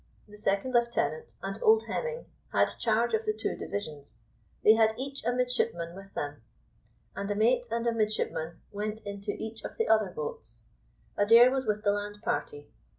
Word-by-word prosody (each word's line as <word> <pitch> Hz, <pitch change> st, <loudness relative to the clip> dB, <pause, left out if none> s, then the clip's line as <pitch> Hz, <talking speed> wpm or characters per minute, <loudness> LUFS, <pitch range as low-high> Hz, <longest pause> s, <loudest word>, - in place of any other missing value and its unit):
The 210 Hz, -, -13 dB
second 210 Hz, +4 st, 0 dB
lieutenant 240 Hz, -, +1 dB
and -, -, -4 dB
old 445 Hz, -1 st, +5 dB
Hemming 485 Hz, 0 st, -3 dB, 0.3 s
had -, -, +3 dB
charge 230 Hz, +1 st, +2 dB
of 220 Hz, 0 st, +2 dB
the 215 Hz, -1 st, 0 dB
two 220 Hz, -, -2 dB
divisions; 150 Hz, -, -6 dB, 0.5 s
they 215 Hz, -, +8 dB
had 220 Hz, 0 st, +4 dB
each 275 Hz, +2 st, -5 dB
a -, -, +1 dB
midshipman 230 Hz, -9 st, -1 dB
with 195 Hz, 0 st, -11 dB
them, 145 Hz, -3 st, -4 dB, 0.7 s
and 200 Hz, 0 st, -3 dB
a 205 Hz, -, 0 dB
mate 240 Hz, +3 st, +3 dB
and 230 Hz, +1 st, -1 dB
a 235 Hz, -, +3 dB
midshipman 210 Hz, -7 st, -1 dB
went 210 Hz, +1 st, -3 dB
into 200 Hz, 0 st, -4 dB
each 220 Hz, 0 st, -7 dB
of -, -, -7 dB
the 455 Hz, -, +1 dB
other 215 Hz, -2 st, +4 dB
boats. 470 Hz, 0 st, -5 dB, 0.5 s
Adair 230 Hz, +4 st, +7 dB
was 265 Hz, -2 st, -1 dB
with 210 Hz, 0 st, 0 dB
the 205 Hz, -, +4 dB
land 205 Hz, 0 st, -3 dB
party. 440 Hz, -2 st, -3 dB
220 Hz, 175 wpm, -29 LUFS, 205-250 Hz, 0.7 s, they